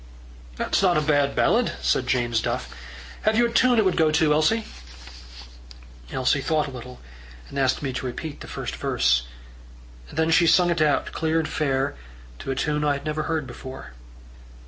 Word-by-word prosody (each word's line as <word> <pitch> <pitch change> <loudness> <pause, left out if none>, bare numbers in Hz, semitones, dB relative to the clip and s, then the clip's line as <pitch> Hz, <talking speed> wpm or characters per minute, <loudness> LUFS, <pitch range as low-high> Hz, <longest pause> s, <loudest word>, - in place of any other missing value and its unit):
"That's - - 0
not 180 -4 +3
a - - +2
bad 145 -2 +1
ballad," 235 +1 +2
said 125 - 0
James 120 -3 +1
Duff. - - -3 0.5
"Have 215 +1 +2
you 240 - +5
a 235 - -3
tune 250 0 +4
it 220 - +4
would 185 - +1
go 160 -2 +4
to, 155 -1 +3
Elsie?" 160 +10 +2 1.5
Elsie 130 +2 +1
thought 155 +1 +1
a 140 - -7
little, 125 0 -10 0.5
and 140 - -4
asked 135 +1 +1
me 135 -2 -2
to 130 - -3
repeat 145 +4 -6
the - - -10
first - - -5
verse. - - +1 0.8
Then 160 0 0
she 170 +1 +5
sung 175 +1 +4
it 170 -2 0
out 150 -2 +1
clear 160 0 -1
and 160 -1 0
fair 135 -3 -1 0.4
to - - -7
a 135 - -1
tune 150 +2 -1
I 145 -1 +2
had 140 0 -6
never 155 0 -2
heard 160 -3 -1
before. 130 - -9
150 Hz, 185 wpm, -24 LUFS, 130-165 Hz, 1.5 s, you